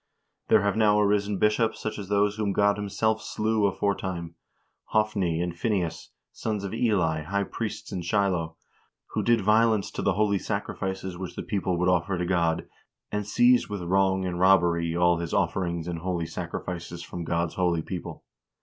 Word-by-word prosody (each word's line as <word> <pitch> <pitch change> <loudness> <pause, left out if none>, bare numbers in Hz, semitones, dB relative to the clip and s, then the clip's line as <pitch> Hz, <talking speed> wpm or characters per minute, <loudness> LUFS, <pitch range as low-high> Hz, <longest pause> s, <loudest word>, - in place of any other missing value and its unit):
There - - +5
have 100 -1 +1
now 105 -1 +4
arisen 105 -1 +2
bishops 105 +3 +2
such 110 0 -4
as 100 -2 -7
those 105 0 +2
whom 105 -2 0
God 100 0 +3
himself 110 +2 -1
slew 110 -1 0
aforetime, 95 -4 -2 0.5
Hophni 100 -6 0
and 85 -1 -2
Phineas, 90 -3 -2 0.2
sons 105 -3 -3
of 100 - -4
Eli, 95 -9 +1
high 100 +6 -1
priest 110 +2 -5
in 90 - -3
Shiloh, 85 -3 0 0.6
who - - -1
did 115 -1 +3
violence 110 0 +3
to - - -4
the 100 - +2
holy 100 0 +2
sacrifices 95 0 -4
which 95 -2 -6
the - - -4
people 95 -4 -1
would 90 +1 +1
offer 90 +1 +1
to 90 - -1
God, 85 -3 0 0.4
and 105 -1 -2
seized 245 - +4
with 100 -3 -4
wrong 95 +1 +2
and 90 -1 -3
robbery 85 -3 +3
all 85 -1 +4
His 85 0 -3
offerings 85 -2 -1
and 85 -2 -3
holy 85 -1 -2
sacrifices 85 0 -5
from 85 +1 -6
God's 85 0 -1
holy 85 -3 +1
people. 90 +1 -6
95 Hz, 170 wpm, -26 LUFS, 85-105 Hz, 0.6 s, There